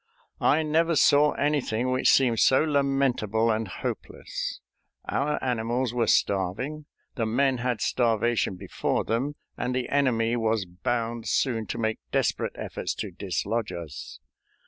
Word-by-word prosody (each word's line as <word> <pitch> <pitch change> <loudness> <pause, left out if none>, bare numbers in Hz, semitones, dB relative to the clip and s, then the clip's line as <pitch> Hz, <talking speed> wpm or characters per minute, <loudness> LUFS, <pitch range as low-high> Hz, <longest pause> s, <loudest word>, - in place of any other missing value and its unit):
I 160 +2 +3
never 165 +2 +2
saw 150 0 +5
anything 130 -5 0
which 130 0 +3
seemed 120 -4 +4
so 130 +3 +5
lamentable 135 -7 +1
and 110 0 -1
hopeless. 95 - -5 0.5
Our 150 +2 0
animals 120 0 -1
were 120 -2 +1
starving, 110 +11 0 0.3
the 115 -4 -1
men 130 +2 +1
had 125 -3 -1
starvation 115 -4 +1
before 90 0 -2
them, 130 +6 -1 0.2
and 125 +1 -2
the 125 -1 -2
enemy 120 -5 +2
was 110 -3 0
bound 115 +6 -3
soon 115 -5 0
to - - -4
make 110 -1 -1
desperate - - 0
efforts - - -4
to 105 - -5
dislodge 100 +4 -2
us. 85 -6 -8
120 Hz, 135 wpm, -26 LUFS, 110-135 Hz, 0.5 s, saw